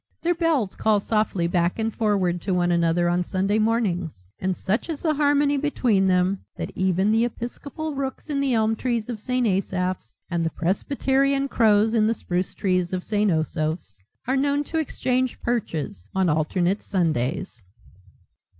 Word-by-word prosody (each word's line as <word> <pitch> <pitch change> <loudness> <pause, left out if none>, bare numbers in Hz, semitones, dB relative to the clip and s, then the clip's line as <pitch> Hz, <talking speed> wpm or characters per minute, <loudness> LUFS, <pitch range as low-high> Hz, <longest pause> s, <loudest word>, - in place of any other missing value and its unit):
Their 345 +1 +3
bells 320 - 0
call 215 -1 +2
softly 210 -4 0
back 170 0 +1
and 225 -1 -1
forward 190 -5 +1
to 190 0 -1
one 175 -1 +2
another 170 0 +2
on 175 +1 +1
Sunday 195 +4 0
mornings 190 - 0 0.2
and 185 -1 -1
such 215 - -1
is 310 -3 -4
the 315 -2 +2
harmony 290 -1 +2
between 245 -9 +1
them 185 +1 +2 0.2
that - - -4
even 190 +2 +1
the 225 +1 +3
episcopal 280 +6 -5
rooks 270 +1 -4
in 290 -2 -1
the 275 -3 +1
elm 220 0 +2
trees 235 -1 -2
of 230 -3 -4
St. 250 +3 0
Asaph's 185 -2 -1
and 170 -2 -1
the 165 - +1
presbyterian 275 - 0
crows 220 -3 +3
in 215 -2 +3
the 230 - +1
spruce 180 -2 -2
trees 185 -2 0
of 180 -1 -2
St. 210 -1 +1
Osoph's 155 - -2 0.2
are 260 - +1
known 285 +1 +1
to 320 +2 -2
exchange 255 -4 -1
perches 155 - -3
on 190 -2 +2
alternate 175 +5 +1
Sundays. 155 - -1
205 Hz, 165 wpm, -24 LUFS, 180-255 Hz, 0.2 s, Their